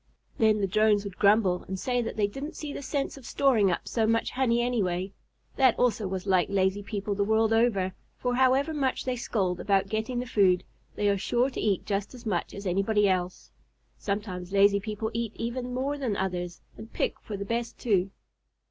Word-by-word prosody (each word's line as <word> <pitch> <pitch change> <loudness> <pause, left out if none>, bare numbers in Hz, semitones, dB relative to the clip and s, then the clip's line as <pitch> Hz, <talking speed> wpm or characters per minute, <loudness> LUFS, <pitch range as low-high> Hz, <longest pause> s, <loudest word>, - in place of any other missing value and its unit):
Then 215 -2 +4
the - - +2
Drones 210 +1 +3
would 200 -3 -8
grumble 200 -3 +3
and 190 - -4
say 245 +2 0
that 230 - -4
they 210 - +3
didn't 275 +9 -6
see 295 -2 -6
the - - -6
sense 280 0 -3
of 265 - -13
storing 235 -8 +3
up 175 - -2
so 225 -2 +1
much 230 0 +1
honey 250 -2 +1
anyway. 195 -6 -1 0.4
That 260 -3 +4
also 225 -4 +1
was 185 0 -4
like 185 -2 +2
lazy 195 0 +1
people 205 0 -3
the 200 0 0
world 220 +1 +2
over, 210 -5 +2 0.2
for 250 -1 -1
however 260 +4 +3
much 270 -4 -1
they 255 -1 -1
scold 190 -7 -1
about 195 -1 +1
getting 220 +4 -2
the 250 - -3
food, 190 -6 +3 0.3
they 205 - 0
are 200 -1 +2
sure 245 +7 +1
to - - -4
eat 200 -4 0
just 200 +4 -2
as 240 -1 -13
much 185 -6 -2
as 200 +1 -8
anybody 200 +3 +2
else. 185 -1 -2 0.5
Sometimes 195 -3 -4
lazy 200 0 +5
people 215 +2 -4
eat 230 -1 -2
even 245 +2 -4
more 275 +3 -2
than 235 -7 -1
others, 180 -2 -3 0.2
and 220 +1 -10
pick - - -2
for 210 - -6
the 200 - -5
best 235 +2 -3
too. 195 -5 +1
210 Hz, 200 wpm, -27 LUFS, 195-240 Hz, 0.5 s, lazy